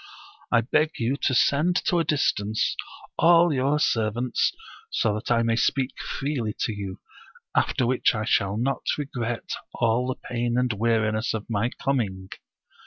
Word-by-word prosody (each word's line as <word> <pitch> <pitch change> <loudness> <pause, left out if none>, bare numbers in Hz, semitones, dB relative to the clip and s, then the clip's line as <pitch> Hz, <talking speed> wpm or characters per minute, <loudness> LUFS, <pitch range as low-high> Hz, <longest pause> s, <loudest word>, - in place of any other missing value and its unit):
I 115 - +5
beg 155 +6 +1
you 120 +3 0
to 130 - 0
send 155 +8 +3
to 180 -5 +2
a - - +2
distance 110 -8 0 0.4
all 170 -1 +6
your 140 +2 +1
servants, 115 0 +1 0.4
so 110 - +1
that 105 +2 -5
I 115 -1 +3
may 115 0 +1
speak 130 +2 +1
freely 130 -7 -3
to 110 - 0
you, 100 -2 -6 0.6
after 130 - +2
which 125 0 +2
I 105 0 -2
shall 100 -2 +1
not 135 +4 -1 0.2
regret 120 -5 -4 0.2
all 120 +1 +1
the 130 - -1
pain 120 0 -1
and 125 -2 +1
weariness 110 0 0
of 110 - -5
my 110 +2 +1
com 135 0 0
ing." 95 -3 -6
120 Hz, 160 wpm, -25 LUFS, 110-135 Hz, 0.6 s, all